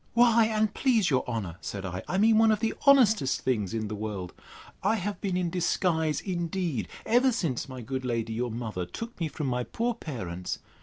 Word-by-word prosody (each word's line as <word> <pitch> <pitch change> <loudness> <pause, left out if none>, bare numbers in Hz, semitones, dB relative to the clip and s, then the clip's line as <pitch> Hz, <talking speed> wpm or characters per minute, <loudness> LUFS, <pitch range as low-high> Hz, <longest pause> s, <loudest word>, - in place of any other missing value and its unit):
—Why, 235 -1 +6
and 215 -1 +1
please 230 - +2
your 130 - +2
honour, 100 -8 -3
said 100 -1 -5
I, 90 0 -4
I 185 - -1
mean 220 +2 +5
one 225 0 +6
of 215 - +2
the 225 0 0
honestest 220 - +5
things 105 -8 0
in 110 -1 -2
the 105 - -5
world. 105 -4 -5 0.5
I 225 - +2
have 205 0 -3
been 190 -3 -1
in 175 -2 -1
disguise, 160 -3 +1
indeed, 175 - -2 0.2
ever 250 +3 +4
since 150 - -2
my 130 -1 -7
good 130 +2 -4
lady 115 -2 -2
your 120 +2 -1
mother 110 -6 -4
took 230 - -7
me 165 - 0
from 150 0 -5
my 125 -1 0
poor 235 - -1
parents. 95 - -5
160 Hz, 200 wpm, -28 LUFS, -, 0.5 s, Why